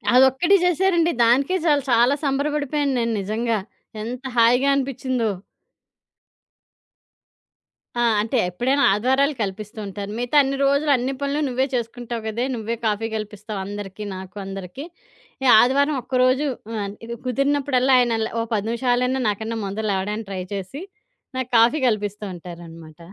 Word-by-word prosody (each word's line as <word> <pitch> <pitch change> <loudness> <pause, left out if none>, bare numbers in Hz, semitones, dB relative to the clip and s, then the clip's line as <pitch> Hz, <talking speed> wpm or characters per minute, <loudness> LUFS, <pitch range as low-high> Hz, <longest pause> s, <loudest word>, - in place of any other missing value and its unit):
అదొక్కటి 265 +9 +5
చేశారండి. 345 -1 +2
దానికే 270 +10 +3
చాలు. 290 -3 +3
చాలా 240 +4 +4
సంబరపడిపోయాను 285 0 0
నేను 230 -1 0
నిజంగా. 220 +3 -1 0.4
ఎంత 245 +3 -6
హాయిగా 245 +4 +5
అనిపిచ్చిందో! 260 -4 -1 2.7
ఆ! - - +3 0.2
అంటే 225 +5 -1
ఎప్పుడైనా 260 +10 +1
ఆదివారాలు 265 +8 +2
కల్పిస్తూ 210 +2 -5
ఉంటారు. 200 +1 -6
మిగతా 245 +4 +1
అన్ని 275 0 -2
రోజులు 280 +2 +2
అన్ని 255 +2 -2
పనులు 280 +1 -1
నువ్వే 260 +1 0
చేసుకుంటావు 235 -1 -4
కదే! 230 +3 -1
నువ్వే 230 0 -3
కాఫీ 220 +1 0
కల్పిస్తావు 210 -1 -5
అందరికీ, 205 0 -7
నాకు 190 +2 -9
అందరికీ. 195 - -7 0.7
ఆదివారం 280 +5 +3
ఒక్కరోజు 255 +3 +2 0.3
ఆహ్, 200 -2 -3 0.3
కుదిరినప్పుడల్లా 270 0 +1
ఆయనలా 230 -2 +1
ఒక - - -2
10 210 0 -1
నిమిషాలైనా 250 +2 +1
నాకన్నా 220 +2 -3
ముందర 205 +3 -4
లేవడానికి 200 +2 -3
ట్రై 190 -1 -3
చేసి, 200 - -5 0.6
నాకు 260 -1 -3
కాఫీ 235 +7 +4
కల్పిస్తూ 210 -2 -2
ఉంటారనమాట. 165 -2 -11
240 Hz, 125 wpm, -22 LUFS, 210-270 Hz, 2.7 s, అదొక్కటి